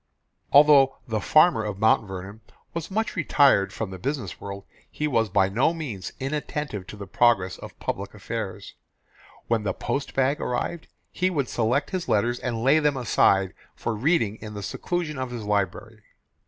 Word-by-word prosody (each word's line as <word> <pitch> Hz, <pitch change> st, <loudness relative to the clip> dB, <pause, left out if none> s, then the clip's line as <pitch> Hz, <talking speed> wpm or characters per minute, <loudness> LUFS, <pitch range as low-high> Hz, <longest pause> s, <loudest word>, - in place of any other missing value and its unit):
Although 140 Hz, -2 st, +6 dB
the 110 Hz, -2 st, -1 dB
Farmer 155 Hz, -, +4 dB
of 105 Hz, -2 st, -4 dB
Mount 110 Hz, 0 st, +3 dB
Vernon 95 Hz, +3 st, -8 dB, 0.3 s
was 165 Hz, -1 st, -4 dB
much 220 Hz, +3 st, -1 dB
retired 140 Hz, -, +3 dB
from 105 Hz, -1 st, -5 dB
the 95 Hz, -, -8 dB
business 130 Hz, -5 st, -4 dB
world, 100 Hz, 0 st, -7 dB, 0.3 s
he 150 Hz, -, -2 dB
was 115 Hz, -6 st, +1 dB
by 95 Hz, 0 st, +3 dB
no 125 Hz, -, +1 dB
means 120 Hz, -, -5 dB
inattentive 140 Hz, -7 st, -4 dB
to -, -, -8 dB
the 100 Hz, -, -7 dB
progress 95 Hz, -3 st, +2 dB
of -, -, -11 dB
public -, -, -4 dB
affairs. -, -, -6 dB, 0.7 s
When 115 Hz, -2 st, +1 dB
the 100 Hz, -3 st, -1 dB
post 140 Hz, -, -3 dB
bag 135 Hz, +3 st, +1 dB
arrived, 155 Hz, +6 st, -3 dB, 0.2 s
he 185 Hz, 0 st, 0 dB
would 145 Hz, -8 st, -1 dB
select 120 Hz, +5 st, 0 dB
his 185 Hz, -2 st, -3 dB
letters 120 Hz, +4 st, +1 dB
and 115 Hz, -2 st, -3 dB
lay 140 Hz, +5 st, +5 dB
them 150 Hz, -2 st, +1 dB
aside 95 Hz, -6 st, +2 dB, 0.2 s
for 115 Hz, -, -3 dB
reading 110 Hz, -, +1 dB
in 105 Hz, -1 st, -9 dB
the 100 Hz, -, -6 dB
seclusion 160 Hz, -, -3 dB
of 130 Hz, -1 st, -3 dB
his 120 Hz, -3 st, -6 dB
library. 105 Hz, +2 st, -2 dB
120 Hz, 170 wpm, -25 LUFS, 105-145 Hz, 0.7 s, Although